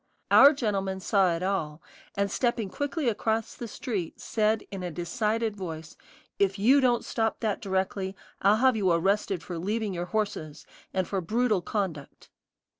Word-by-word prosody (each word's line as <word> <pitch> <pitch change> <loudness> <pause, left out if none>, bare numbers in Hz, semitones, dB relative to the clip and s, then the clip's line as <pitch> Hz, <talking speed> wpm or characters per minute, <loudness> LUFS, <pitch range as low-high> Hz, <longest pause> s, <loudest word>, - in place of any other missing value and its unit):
Our 280 - +9
gentleman 195 -7 -1
saw 190 -2 +2
it 165 - -4
all, 165 -6 -1 0.4
and 200 0 0
stepping 235 -5 0
quickly 285 0 -2
across 220 0 0
the 235 - -7
street, 210 - -4
said 220 0 0
in 195 -2 -5
a 180 - -3
decided 215 +6 -1
voice: 160 -5 -7 0.4
"If 195 0 +2
you 255 +8 +5
don't 245 -2 +2
stop 225 -1 -1
that 215 -3 -1
directly, 190 0 -2 0.3
I'll 200 +2 +5
have 260 +2 +4
you 200 -4 +1
arrested 190 +1 +1
for 175 -2 -5
leaving 210 +3 -2
your 175 0 -3
horses, 180 -7 -3 0.3
and 185 -2 -1
for 195 -2 -1
brutal 215 +2 +1
conduct." 175 -7 -4
200 Hz, 160 wpm, -27 LUFS, 185-225 Hz, 0.4 s, Our